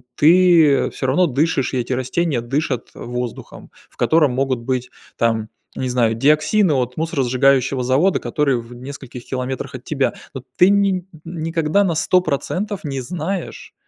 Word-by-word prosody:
Ты 165 Hz, -3 st, +5 dB
всё 130 Hz, -, -5 dB
равно 165 Hz, +8 st, +3 dB
дышишь, 140 Hz, -1 st, 0 dB
и -, -, 0 dB
эти 125 Hz, +1 st, -2 dB
растения 130 Hz, +1 st, -1 dB
дышат 135 Hz, 0 st, -2 dB
воздухом, 125 Hz, 0 st, -7 dB, 0.2 s
в -, -, -27 dB
котором 155 Hz, -5 st, +3 dB
могут 130 Hz, -1 st, 0 dB
быть 125 Hz, +1 st, -3 dB, 0.3 s
там, 115 Hz, -1 st, 0 dB, 0.3 s
не 130 Hz, -1 st, -3 dB
знаю, 120 Hz, -3 st, +2 dB
диоксины 155 Hz, -, +3 dB
от 125 Hz, -1 st, -1 dB
мусоросжигающего 135 Hz, -4 st, +1 dB
завода, 140 Hz, +10 st, +2 dB
который 140 Hz, -5 st, 0 dB
в 115 Hz, +1 st, -13 dB
нескольких 130 Hz, -1 st, -9 dB
километрах 130 Hz, +1 st, -4 dB
от 125 Hz, -, -9 dB
тебя. 140 Hz, -3 st, -1 dB, 0.2 s
Но 130 Hz, -2 st, -7 dB
ты 180 Hz, +2 st, +6 dB
ни 195 Hz, -3 st, +2 dB, 0.2 s
никогда 165 Hz, +2 st, 0 dB
на 170 Hz, -4 st, 0 dB
100 180 Hz, +3 st, +3 dB
процентов 185 Hz, +6 st, -3 dB
не 135 Hz, -3 st, -3 dB
знаешь, 175 Hz, +6 st, -5 dB
140 Hz, 150 wpm, -20 LUFS, 125-165 Hz, 0.3 s, ты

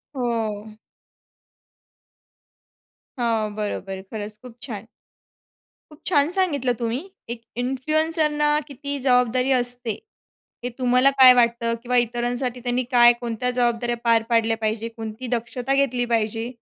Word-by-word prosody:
हो. 220 Hz, -4 st, -3 dB, 2.4 s
हां, 225 Hz, -3 st, 0 dB
बरोबर. 195 Hz, -2 st, -4 dB
खरंच 210 Hz, -1 st, -6 dB
खूप 250 Hz, -2 st, -13 dB
छान. 225 Hz, -3 st, -7 dB, 1.0 s
खूप 300 Hz, -, -15 dB
छान 290 Hz, -4 st, +3 dB
सांगितलं 285 Hz, -10 st, +1 dB
तुम्ही. 235 Hz, +2 st, -1 dB, 0.3 s
एक 235 Hz, -1 st, -6 dB, 0.2 s
इन्फ्लुएन्सरला 300 Hz, +3 st, +1 dB
किती 280 Hz, 0 st, -5 dB
जबाबदारी 250 Hz, 0 st, +2 dB
असते, 245 Hz, -2 st, +3 dB, 0.7 s
हे 245 Hz, -, -2 dB
तुम्हाला 250 Hz, +2 st, +4 dB
काय 255 Hz, -1 st, +10 dB
वाटतं 235 Hz, -1 st, +2 dB
किंवा 250 Hz, 0 st, 0 dB
इतरांसाठी 240 Hz, +1 st, -1 dB
त्यांनी 245 Hz, +1 st, 0 dB
काय, 240 Hz, -1 st, +7 dB
कोणत्या 240 Hz, +1 st, -2 dB
जबाबदाऱ्या 240 Hz, -1 st, 0 dB
पार 230 Hz, -1 st, +3 dB
पाडल्या 225 Hz, -1 st, +2 dB
पाहिजेत, 220 Hz, +1 st, -2 dB
कोणती 225 Hz, +3 st, -6 dB
दक्षता 245 Hz, +3 st, -3 dB
घेतली 255 Hz, -3 st, +1 dB
पाहिजे. 225 Hz, +1 st, -1 dB
245 Hz, 115 wpm, -23 LUFS, 230-255 Hz, 2.4 s, काय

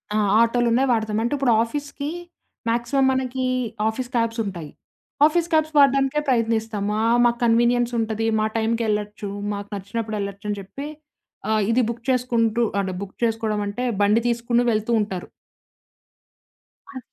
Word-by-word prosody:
ఆ! -, -, +2 dB, 0.2 s
ఆటోలున్నాయి, 240 Hz, +2 st, +2 dB
వాడతాం. 220 Hz, -2 st, 0 dB
అంటే 240 Hz, -, -1 dB
ఇప్పుడు 265 Hz, -3 st, +2 dB
ఆఫీసుకి 285 Hz, +3 st, -5 dB, 0.6 s
మాక్సిమం 240 Hz, +4 st, +1 dB
మనకి 260 Hz, 0 st, -2 dB, 0.4 s
ఆఫీసు 245 Hz, +3 st, -3 dB
క్యాబ్స్ 230 Hz, 0 st, 0 dB
ఉంటాయి. 170 Hz, -6 st, -6 dB, 0.6 s
ఆఫీసు 335 Hz, +2 st, +2 dB
క్యాబ్స్ 310 Hz, 0 st, +2 dB
వాడడానికే 275 Hz, 0 st, +4 dB
ప్రయత్నిస్తాం. 225 Hz, -4 st, 0 dB, 0.2 s
ఆ! -, -, +1 dB, 0.2 s
మాకు 235 Hz, 0 st, +2 dB
కన్వీనియన్స్ 240 Hz, +1 st, +3 dB
ఉంటది, 225 Hz, 0 st, -1 dB
మా 215 Hz, -, +1 dB
టైంకెళ్ళొచ్చు. 215 Hz, -2 st, -1 dB, 0.2 s
మాకు 200 Hz, 0 st, -6 dB
నచ్చినప్పుడు 215 Hz, +2 st, -4 dB
ఎళ్ళొచ్చని 200 Hz, +1 st, -4 dB
చెప్పి, 275 Hz, +10 st, -8 dB, 0.6 s
ఆహ్, 215 Hz, -1 st, +2 dB
ఇది 250 Hz, -, +3 dB
బుక్ 235 Hz, 0 st, -6 dB
చేసుకుంటూ 235 Hz, -2 st, +1 dB, 0.2 s
అంటే 190 Hz, -1 st, -2 dB
బుక్ 200 Hz, -1 st, -8 dB
చేసుకోవడమంటే 220 Hz, 0 st, -1 dB, 0.2 s
బండి 210 Hz, +3 st, +4 dB
తీసుకొని 235 Hz, 0 st, +1 dB
వెళ్తూ 215 Hz, +2 st, -1 dB
ఉంటారు. 190 Hz, -4 st, -5 dB, 1.6 s
అ 260 Hz, -, -8 dB
230 Hz, 130 wpm, -23 LUFS, 215-250 Hz, 1.6 s, వాడడానికే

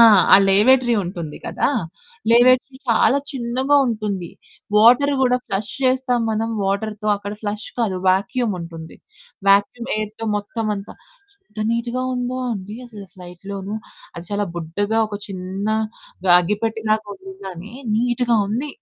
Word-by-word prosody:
ఆ! -, -, +10 dB, 0.3 s
ఆ -, -, +11 dB
లేవేటరీ 240 Hz, +5 st, +5 dB
ఉంటుంది 170 Hz, -4 st, -6 dB
కదా! -, -, 0 dB, 0.6 s
లేవేటరీ 255 Hz, +3 st, +4 dB
చాలా 250 Hz, +4 st, +4 dB
చిన్నగా 260 Hz, +2 st, +1 dB
ఉంటుంది. 210 Hz, -6 st, -3 dB, 0.5 s
వాటరు 250 Hz, +6 st, +6 dB
గూడా 250 Hz, -1 st, +3 dB
ఫ్లష్ 200 Hz, +3 st, -2 dB
చేస్తాం 255 Hz, -1 st, +2 dB
మనం 220 Hz, +1 st, -1 dB
వాటర్‌తో, 210 Hz, +2 st, -2 dB
అక్కడ 205 Hz, 0 st, -6 dB
ఫ్లష్ 210 Hz, +1 st, -3 dB
కాదు. 205 Hz, -6 st, 0 dB
వ్యాక్యూమ్ 215 Hz, +3 st, +1 dB
ఉంటుంది 165 Hz, -1 st, -9 dB, 0.5 s
వ్యాక్యూమ్ 200 Hz, +4 st, +3 dB
ఎయిర్‌తో 215 Hz, +1 st, -4 dB
మొత్తమంతా. 205 Hz, -1 st, -4 dB, 0.5 s
ఎంత 215 Hz, 0 st, -4 dB
నీట్‌గా 235 Hz, +2 st, -1 dB
ఉందో 250 Hz, +1 st, -2 dB
అండి, 205 Hz, +1 st, -6 dB
అసలు 210 Hz, -4 st, -11 dB
ఫ్లైట్‌లోనూ 190 Hz, +3 st, -7 dB, 0.4 s
అది 170 Hz, -, -7 dB
చాలా 205 Hz, 0 st, -1 dB
బుడ్డగా 205 Hz, +7 st, -1 dB
ఒక 205 Hz, -, -4 dB
చిన్న 190 Hz, +1 st, -5 dB, 0.6 s
గ -, -, -2 dB
అగ్గిపెట్టెలాగా 215 Hz, +2 st, -1 dB
ఉంది 190 Hz, 0 st, -11 dB
గానీ, 185 Hz, +4 st, -9 dB, 0.2 s
నీట్‌గా 240 Hz, 0 st, +1 dB
ఉంది. 255 Hz, +8 st, -2 dB
215 Hz, 130 wpm, -21 LUFS, 195-240 Hz, 0.6 s, ఆ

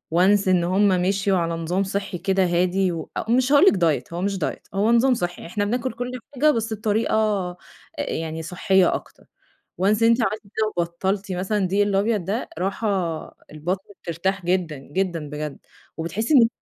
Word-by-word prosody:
Once 195 Hz, +2 st, +4 dB
إن 180 Hz, -2 st, +3 dB
هُم 190 Hz, +4 st, +3 dB
مشيوا 190 Hz, +1 st, +2 dB
على 170 Hz, -1 st, 0 dB
نظام 165 Hz, +4 st, -1 dB
صحي 195 Hz, -1 st, -3 dB
كده 190 Hz, +1 st, +1 dB
هادي 180 Hz, +2 st, +1 dB
و 165 Hz, -2 st, -5 dB, 0.2 s
مش 255 Hz, +2 st, +3 dB
هاقول 290 Hz, +5 st, +7 dB
لِك -, -, +7 dB, 0.3 s
Diet 145 Hz, -, -15 dB
هو 175 Hz, -, -3 dB
مش 200 Hz, 0 st, 0 dB
Diet 160 Hz, -, -3 dB
هو 205 Hz, +4 st, +2 dB
نظام 245 Hz, +3 st, +4 dB
صحي، 175 Hz, -7 st, -3 dB
إحنا 205 Hz, +4 st, -2 dB
بناكل 240 Hz, +3 st, -1 dB
كل 245 Hz, +1 st, -4 dB, 0.2 s
حاجة 300 Hz, +4 st, +4 dB
بس 225 Hz, -3 st, -2 dB
بطريقة 210 Hz, -3 st, 0 dB, 0.4 s
يعني 160 Hz, -, -3 dB
صحية 185 Hz, +2 st, +2 dB
أكتر -, -, -9 dB, 0.6 s
Once 210 Hz, +3 st, +3 dB
إن 230 Hz, -, +6 dB
أنتِ 230 Hz, +1 st, +4 dB
عملتِ 215 Hz, +1 st, -1 dB
كده 215 Hz, +1 st, -2 dB
وبطلتِ 190 Hz, +3 st, -1 dB
مثلًا 190 Hz, +4 st, -1 dB
الدقيق 195 Hz, +1 st, +2 dB
الأبيض 200 Hz, -1 st, +1 dB
ده 215 Hz, +7 st, -2 dB
راحة 195 Hz, +4 st, -2 dB, 0.7 s
البطن 175 Hz, +6 st, -3 dB
بترتاح 180 Hz, +3 st, -2 dB
جدًا، 175 Hz, -4 st, 0 dB
جدًا 165 Hz, +2 st, -3 dB
بجد 150 Hz, -1 st, -5 dB, 0.4 s
وبتحسي 210 Hz, -, -1 dB
إن 230 Hz, -4 st, +7 dB
195 Hz, 170 wpm, -23 LUFS, 175-215 Hz, 0.7 s, هاقول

